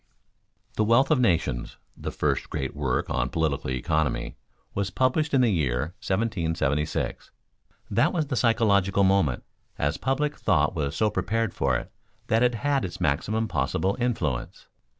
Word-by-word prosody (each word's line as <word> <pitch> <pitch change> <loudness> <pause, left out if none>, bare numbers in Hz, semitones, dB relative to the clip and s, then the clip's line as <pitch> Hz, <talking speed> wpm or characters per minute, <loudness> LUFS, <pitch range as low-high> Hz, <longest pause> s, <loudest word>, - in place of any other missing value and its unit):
_ - - -27
"The 110 - +3
Wealth 120 +6 +4
of 150 - +4
Nations," 80 - 0 0.2
the - - -5
first - - -1
great 65 +1 -3
work 70 -3 -1
on 65 0 0
political 80 -4 -1
economy, 65 +2 -1 0.4
was 100 -1 -1
published 130 - +1
in 135 - +4
the 120 -3 +3
year 75 -2 0
1776. 80 -8 -1 0.6
That - - +3
was 160 -3 0
the 140 -2 -3
"psychological 100 -5 +3
moment," 95 -10 +2 0.3
as 70 +2 0
public 140 +4 -1
thought - - +2
was 70 -2 -2
so 110 -1 +2
prepared 115 0 -1
for - - +1
it - - -8 0.4
that 110 +1 +3
it 125 -1 +3
had 140 +3 0
its 85 -2 -5
maximum 100 +8 0
possible 90 +4 0
influence. 110 - -2
95 Hz, 150 wpm, -26 LUFS, 75-115 Hz, 0.6 s, Wealth